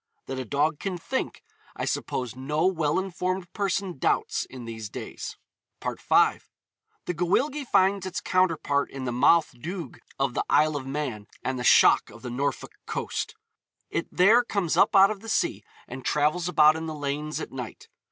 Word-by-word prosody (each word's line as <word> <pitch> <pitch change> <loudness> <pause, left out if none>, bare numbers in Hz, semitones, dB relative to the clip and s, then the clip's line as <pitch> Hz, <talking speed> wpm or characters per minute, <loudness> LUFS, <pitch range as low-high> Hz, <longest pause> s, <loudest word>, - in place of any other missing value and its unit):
That 135 0 -4
a 130 - -4
dog 145 +5 0
can 190 -3 -3
think, 260 +10 -4 0.3
I - - -3
suppose 125 -1 -2
no 150 +5 -1
well 165 -6 +1
informed 185 -1 -2
person 195 -5 -2
doubts - - +1
in 125 -3 -10
these 110 -2 -6
days. - - -7 0.4
V. - - -2 1.2
The 180 - -1
Gwyllgi 265 - 0
finds 190 -1 +3
its 185 - -3
counterpart 165 -6 +1
in 135 -1 -6
the 125 - -1
Mauthe 150 +6 +4
Doog 170 -3 -6 0.2
of 135 -2 0
the - - 0
Isle 155 0 +4
of 135 -2 -4
Man 135 -7 -4 0.2
and 130 -1 -2
the - - -3
Shock - - +6
of - - -14
the 125 - -5
Norfolk 140 +4 -2 0.2
coast. - - -3 0.6
It - - -2
there 215 +7 +5
comes 200 -8 -1
up - - +4
out 195 +1 +7
of 210 - -5
the 225 +2 -9
sea 325 +8 0 0.2
and 130 +1 -8
travels 155 +6 +1
about 155 -2 +6
in 160 0 -4
the 155 - -4
lanes 150 +1 -3
at - - -6
night. 125 -4 -7
155 Hz, 175 wpm, -26 LUFS, 135-185 Hz, 1.2 s, out